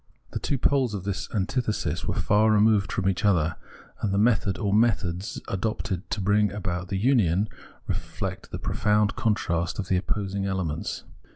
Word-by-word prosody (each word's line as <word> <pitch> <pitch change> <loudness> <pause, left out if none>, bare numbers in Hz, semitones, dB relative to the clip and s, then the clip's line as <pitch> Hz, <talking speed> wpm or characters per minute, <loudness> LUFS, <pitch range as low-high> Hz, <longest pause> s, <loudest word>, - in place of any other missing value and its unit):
The - - -3
two 140 - -1
poles 130 -4 +2
of 95 - -4
the 100 0 -1 0.2
antithesis 110 +2 -1
were - - -1
far 105 +2 +3
removed 105 -1 +4
from 95 - -1
each 95 -2 0
other, 85 -6 +2 0.4
and 105 - 0
the 100 - +1
method 105 -3 +2
or 100 -3 0
methods 105 -4 +1
adopted 95 -1 -2
to - - -2
bring 100 +1 +3
about 90 -3 -3
the 95 - -2
union 105 -5 +3 0.4
reflect - - -4
the - - -5
profound 105 0 +1
contrast 85 -6 0
of 95 -2 -4
the 95 - +3
opposing 100 +1 -2
elements. 90 -5 -2
100 Hz, 165 wpm, -26 LUFS, 95-110 Hz, 0.4 s, removed